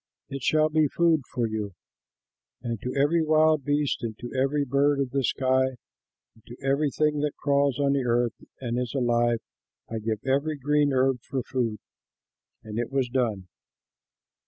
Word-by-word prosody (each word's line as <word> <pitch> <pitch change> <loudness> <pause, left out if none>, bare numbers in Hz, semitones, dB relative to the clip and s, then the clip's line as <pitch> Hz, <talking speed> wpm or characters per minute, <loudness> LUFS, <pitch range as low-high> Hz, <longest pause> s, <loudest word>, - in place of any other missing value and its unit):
It 135 -1 -5
shall 155 +4 +3
be 155 -1 +3
food 165 +1 +2
for 120 -2 0
you. 105 -3 -4 0.9
And 115 -3 -3
to 125 - -3
every 145 +5 +3
wild 155 -1 +3
beast 145 0 0
and 110 -2 -4
to 120 - -8
every 140 +2 +1
bird 140 +2 +2
of 135 -3 -1
the 135 -1 0
sky 130 +1 +1 0.6
and 110 - -24
to 120 - -10
every 140 +2 +2
thing 150 +1 +1
that 150 0 -1
crawls 140 -2 +1
on 140 -1 +2
the 140 -2 +1
earth 120 -1 +1 0.3
and 120 -1 -2
is 125 +1 -3
alive, 120 -2 +2 0.5
I 115 - -4
give 110 +1 -3
every 140 +3 0
green 145 +1 +2
herb 130 -1 +2
for 130 +1 -4
food." 115 -4 -2 0.9
And 110 +1 -5
it 120 - -2
was 135 -2 0
done. 115 -7 -1
135 Hz, 170 wpm, -26 LUFS, 120-145 Hz, 0.9 s, shall